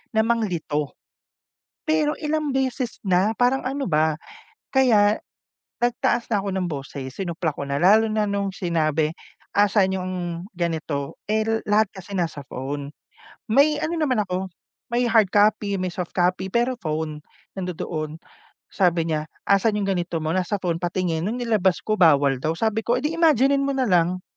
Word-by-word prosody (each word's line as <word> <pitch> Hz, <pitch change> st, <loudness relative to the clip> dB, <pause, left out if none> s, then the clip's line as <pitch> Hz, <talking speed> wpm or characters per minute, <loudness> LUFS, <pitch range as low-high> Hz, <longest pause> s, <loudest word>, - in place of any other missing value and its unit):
na 220 Hz, -, +4 dB
manglito. 175 Hz, -11 st, -1 dB, 0.9 s
Pero 310 Hz, -1 st, +2 dB
ilang 305 Hz, -1 st, -1 dB
beses 260 Hz, -2 st, -1 dB
na 185 Hz, +3 st, +3 dB
parang, 250 Hz, +2 st, +2 dB
ano 275 Hz, +2 st, -2 dB
ba, 155 Hz, 0 st, +2 dB, 0.6 s
kaya 220 Hz, -6 st, +4 dB, 0.6 s
nagtaas 245 Hz, 0 st, +1 dB
na 210 Hz, -, +3 dB
ako 200 Hz, -, -3 dB
ng 185 Hz, -, 0 dB
boses, 135 Hz, -1 st, -6 dB
sinupla 170 Hz, -3 st, -2 dB
ko 140 Hz, -, -5 dB
na 140 Hz, -, -2 dB
lalo 215 Hz, +5 st, +6 dB
na 215 Hz, 0 st, +1 dB
nung 200 Hz, 0 st, -1 dB
sinabi, 160 Hz, -4 st, 0 dB, 0.4 s
"asan 200 Hz, -1 st, +3 dB
'yong 185 Hz, 0 st, -4 dB, 0.4 s
ganito," 160 Hz, -5 st, -3 dB
eh, 215 Hz, 0 st, +2 dB, 0.2 s
lahat 210 Hz, 0 st, +3 dB
kasi 190 Hz, +1 st, -10 dB
nasa 165 Hz, -5 st, -2 dB
phone, 140 Hz, +2 st, -5 dB, 0.6 s
may 285 Hz, +6 st, +5 dB
ano 330 Hz, +2 st, -1 dB
naman 255 Hz, -8 st, +1 dB
ako 185 Hz, 0 st, -3 dB, 0.4 s
may 240 Hz, +1 st, +2 dB
hard 220 Hz, -4 st, +4 dB
copy, 205 Hz, -1 st, +2 dB
may 185 Hz, -, -1 dB
soft 180 Hz, 0 st, -5 dB
copy, 185 Hz, +1 st, 0 dB
pero 240 Hz, +3 st, +1 dB
phone. 155 Hz, -6 st, -4 dB, 0.3 s
Nandoon, 165 Hz, -4 st, -4 dB, 0.5 s
sabi 170 Hz, -3 st, +1 dB
niya, 155 Hz, -1 st, -1 dB, 0.2 s
"asan 200 Hz, +2 st, +3 dB
'yung 200 Hz, -1 st, -1 dB
ganito 175 Hz, -3 st, -2 dB
mo," 155 Hz, -, -1 dB
nasa 185 Hz, +3 st, -1 dB
phone, 170 Hz, -2 st, 0 dB
"patingin," 175 Hz, -1 st, -1 dB
nung 240 Hz, +4 st, -2 dB
nilabas 205 Hz, -6 st, +1 dB
ko, 215 Hz, 0 st, -1 dB
bawal 140 Hz, -6 st, +4 dB
daw, 155 Hz, +5 st, -1 dB
sabi 220 Hz, +4 st, -1 dB
ko, 235 Hz, -, +3 dB
"eh, 250 Hz, -, -1 dB
di 300 Hz, -, 0 dB
imaginin 280 Hz, -4 st, +3 dB
mo 275 Hz, -, 0 dB
nalang," 185 Hz, -8 st, +2 dB
190 Hz, 160 wpm, -23 LUFS, 165-230 Hz, 0.9 s, lalo